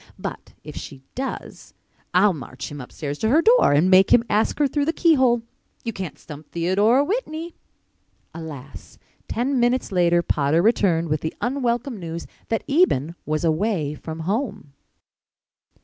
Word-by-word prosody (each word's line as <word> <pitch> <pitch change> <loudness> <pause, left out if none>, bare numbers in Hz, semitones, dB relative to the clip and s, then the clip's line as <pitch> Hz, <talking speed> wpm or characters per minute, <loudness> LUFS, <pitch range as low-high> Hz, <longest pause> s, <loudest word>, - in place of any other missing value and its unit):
But - - -7
if - - -9
she 135 -1 -9
does 265 +1 -6 0.4
I'll 190 +3 +4
march 130 -3 -8
him 145 -1 -7
upstairs 145 +3 -6
to 220 - +1
her 310 +7 +4
door 480 +3 +5
and 150 +5 +4
make 190 +1 +6
him 230 - +6
ask 210 +1 +1
her 295 - +3
through 285 +1 0
the 325 - 0
keyhole. 260 -9 +3 0.4
You 230 - -3
can't 185 -6 -6
stump 150 -1 -11
Theodora 200 +10 +3
Whitney." 335 -4 -3 0.8
Alas! 150 -4 -9 0.3
Ten 255 +3 0
minutes 240 0 +1
later 175 -2 +3
Potter 155 +2 +1
returned 180 -7 +2
with 155 0 0
the 160 - -4
unwelcome 245 -2 -1
news 170 -1 -6 0.2
that 225 - -1
Eben 275 - +2
was 155 +1 -1
away 165 -2 0
from 160 +1 -7
home. 200 - -3
195 Hz, 150 wpm, -23 LUFS, 160-250 Hz, 0.8 s, make